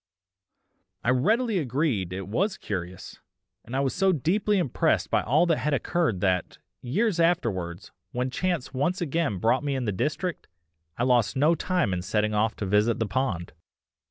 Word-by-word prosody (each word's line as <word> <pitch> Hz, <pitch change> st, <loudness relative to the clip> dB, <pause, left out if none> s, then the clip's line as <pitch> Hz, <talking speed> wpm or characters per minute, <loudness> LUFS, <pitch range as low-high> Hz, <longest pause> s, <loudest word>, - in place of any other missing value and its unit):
I -, -, +1 dB
readily 215 Hz, -, +2 dB
agreed 130 Hz, -, -1 dB
it 95 Hz, 0 st, -5 dB
was 185 Hz, -, 0 dB
curious, 90 Hz, -2 st, -6 dB, 0.4 s
and 120 Hz, -, -7 dB
I 135 Hz, -, +2 dB
was 135 Hz, -2 st, 0 dB
so 195 Hz, 0 st, +3 dB
deeply 195 Hz, +7 st, +1 dB
impressed 170 Hz, -10 st, +1 dB
by -, -, +3 dB
all 150 Hz, +9 st, +3 dB
that 165 Hz, -3 st, +1 dB
had 150 Hz, -1 st, +1 dB
occurred 135 Hz, -, 0 dB
that, 90 Hz, -3 st, 0 dB, 0.2 s
years 180 Hz, -, 0 dB
afterwards, 100 Hz, -, 0 dB, 0.2 s
when 125 Hz, +1 st, -2 dB
chance 175 Hz, -3 st, -2 dB
once 145 Hz, +8 st, 0 dB
again 165 Hz, -, -1 dB
brought 115 Hz, +9 st, +2 dB
me 140 Hz, -1 st, -1 dB
in 130 Hz, -2 st, -2 dB
the 105 Hz, -, 0 dB
district, 150 Hz, -, -2 dB, 0.5 s
I 120 Hz, -, 0 dB
lost 125 Hz, -1 st, +2 dB
no 150 Hz, +5 st, +4 dB
time 170 Hz, -, 0 dB
in 90 Hz, -, -2 dB
setting 105 Hz, +3 st, 0 dB
off 110 Hz, +1 st, +1 dB
to 100 Hz, -, -4 dB
visit 105 Hz, +4 st, +2 dB
the 110 Hz, -, 0 dB
pond. 95 Hz, -5 st, -2 dB
130 Hz, 170 wpm, -26 LUFS, 105-170 Hz, 0.5 s, no